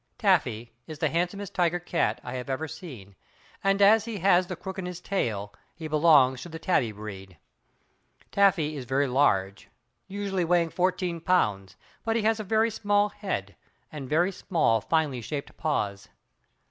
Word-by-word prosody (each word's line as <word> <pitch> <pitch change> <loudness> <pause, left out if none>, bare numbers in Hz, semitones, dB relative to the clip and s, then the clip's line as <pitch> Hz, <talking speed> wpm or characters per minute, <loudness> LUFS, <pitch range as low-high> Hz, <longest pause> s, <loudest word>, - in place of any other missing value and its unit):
Taffy 125 - +1
is 155 - -7
the - - 0
handsomest 180 +4 -2
tiger 175 -1 +1
cat 165 -9 -1
I 125 - -6
have 125 +1 -5
ever 135 +4 -2
seen, 145 - -10 0.5
and 195 0 +2
as 215 +2 +6
he 230 -3 -5
has 185 -1 +3
the 185 - -4
crook 190 +2 -7
in 180 - -4
his 180 -1 -6
tail, 110 - -2 0.2
he 160 -2 -6
belongs 150 -5 +4
to 175 - -8
the 165 - -7
Tabby 160 -9 +1
breed. 95 -4 -9 0.9
Taffy 185 -7 +3
is 135 -3 -6
very 135 +3 +1
large, 100 -8 +1 0.4
usually 195 -2 -2
weighing 170 0 +2
fourteen 180 -1 -1
pounds, 100 - +1 0.3
but 225 0 0
he 225 - 0
has 220 0 +2
a - - -3
very 220 +2 +2
small 205 -1 +1
head, 190 - -5 0.4
and 140 -4 -7
very 175 +5 +2
small, 165 - +1
finely 150 -5 0
shaped 140 +5 -6
paws. 105 -11 -2
165 Hz, 165 wpm, -27 LUFS, 125-190 Hz, 0.9 s, as